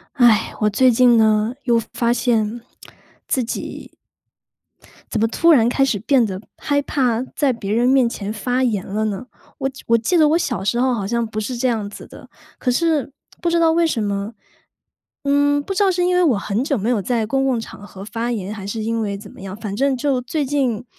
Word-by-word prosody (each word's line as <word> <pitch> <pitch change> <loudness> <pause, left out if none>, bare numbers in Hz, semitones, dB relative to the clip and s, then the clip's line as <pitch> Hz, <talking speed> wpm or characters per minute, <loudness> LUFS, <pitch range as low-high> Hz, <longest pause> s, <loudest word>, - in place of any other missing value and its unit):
唉， 235 -4 +4
我 210 - +3
最 255 +5 +4
近 240 0 +5
呢， 220 +1 +3
又 240 -3 +3
发 235 -1 +1
现 230 -2 0 0.7
自 260 - +1
己 - - -6 1.2
怎 220 - -1
么 225 - +3
突 335 +9 +2
然 240 -7 +5
开 270 - +1
始 240 -6 0
变 250 +4 +3
得 190 -2 -5 0.2
害 285 -1 0
怕 250 -5 0
在 280 -3 +2
别 210 -4 -4
人 240 +3 +2
面 260 -2 +4
前 205 -3 -5
发 245 +4 -1
言 215 -7 0
了 210 +3 -2
呢？ 215 +4 -4 0.3
我 270 - -1
记 270 0 -11
我 230 - +4
记 235 +11 0
得 305 -2 +5
我 320 - +3
小 245 - -2
时 235 +4 0
候 260 0 +2
好 205 -4 -3
像 235 +2 -1
不 215 -1 -4
是 245 +4 -4
这 240 - 0
样 220 -4 -1
子 205 - -11
的。 - - -14 0.3
可 250 - 0
是， 310 +1 +1 0.3
不 345 - 0
知 340 - +2
道 330 -1 +4
为 335 +1 +3
什 240 -9 -1
么， 200 +1 -3 0.9
嗯， 285 +1 +2
不 390 - -5
知 390 - +1
道 390 - +4
是 360 -1 0
因 360 0 +2
为 360 - +3
我 290 -10 +3
很 200 +3 -2
久 280 0 0
没 220 +2 -1
有 235 -4 +1
在 230 +2 -1
公 270 +4 0
共 255 -3 +1
场 210 -2 -10
合 195 -1 -10
发 230 +3 -3
言， 205 -4 -3
还 195 -3 -8
是 220 +2 -4
因 230 +1 -1
为 200 -2 -2
怎 200 0 -11
么 - - -14
样。 195 0 -7
反 210 -2 -5
正 270 +4 +1
就 265 0 0
最 285 +4 -2
近 255 -5 -1
240 Hz, 245 characters per minute, -20 LUFS, 215-270 Hz, 1.2 s, 近